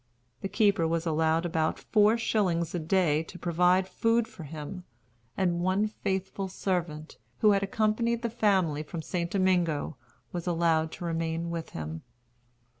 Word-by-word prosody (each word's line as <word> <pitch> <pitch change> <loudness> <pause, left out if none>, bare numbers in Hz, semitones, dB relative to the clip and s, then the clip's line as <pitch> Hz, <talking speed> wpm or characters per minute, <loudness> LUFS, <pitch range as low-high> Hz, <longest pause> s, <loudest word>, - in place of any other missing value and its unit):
The 195 - -3
keeper 200 -7 +3
was 165 +1 -1
allowed 160 +1 +1
about 160 -2 0
four 215 +1 +3
shillings 180 -7 0
a 175 - -1
day 160 -2 +2
to 165 +3 -10
provide 180 +2 +2
food 230 +3 +1
for 160 - -10
him; 160 +5 -7 0.5
and 175 -2 +1
one 185 +3 +2
faithful 195 -2 -3
servant, 170 -5 -3 0.2
who 210 - +6
had 200 -1 +3
accompanied 220 +4 0
the 235 - 0
family 190 -9 +2
from 160 +1 -6
St. 170 0 -2
Domingo, 175 -6 +1 0.3
was 175 0 -5
allowed 165 -2 +2
to 175 - -6
remain 165 0 -2
with 165 -1 -4
him. 80 +1 -5
175 Hz, 150 wpm, -28 LUFS, 160-195 Hz, 0.5 s, who